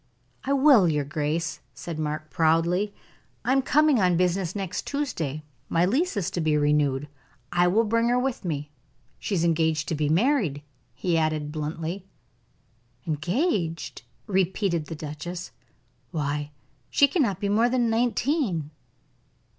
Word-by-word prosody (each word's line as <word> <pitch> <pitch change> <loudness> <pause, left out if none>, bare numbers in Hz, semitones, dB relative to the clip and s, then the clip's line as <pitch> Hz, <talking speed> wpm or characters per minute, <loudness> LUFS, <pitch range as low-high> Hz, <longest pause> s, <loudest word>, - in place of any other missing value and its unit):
"I 275 - 0
will, 265 - +6
your 150 -2 0
grace," 155 +3 -2 0.2
said 165 -2 -6
Mark, 155 0 -3
proudly. 170 +5 +2 0.5
"I 250 - +2
am 270 0 +4
coming 295 -3 +3
on 180 -2 +3
business 180 0 0
next 195 -3 -4
Tuesday; 165 - -3 0.3
my 170 +1 +3
lease 275 - +1
is 190 - -1
to 175 - -2
be 155 -1 +2
renewed. 145 -1 +1 0.4
I 175 0 +3
will 210 +6 +3
bring 230 +2 +1
her 245 - +3
with 255 0 -1
me. 150 -4 -3 0.5
She 200 - -2
is 170 - +1
engaged 160 -2 +1
to - - 0
be 150 -1 0
married," 175 - +2 0.3
he 170 +3 +1
added, 155 -2 -1
bluntly. 160 +5 -4 1.0
"Engaged!" 170 - -1 0.2
repeated 190 -4 0
the 165 - -5
duchess. 155 +4 -6 0.6
"Why, 145 -2 -2 0.4
she 280 - +5
cannot 250 - 0
be 200 - -1
more 220 +4 +3
than 240 -2 +1
nineteen." 230 - 0
175 Hz, 140 wpm, -26 LUFS, 155-225 Hz, 1.0 s, will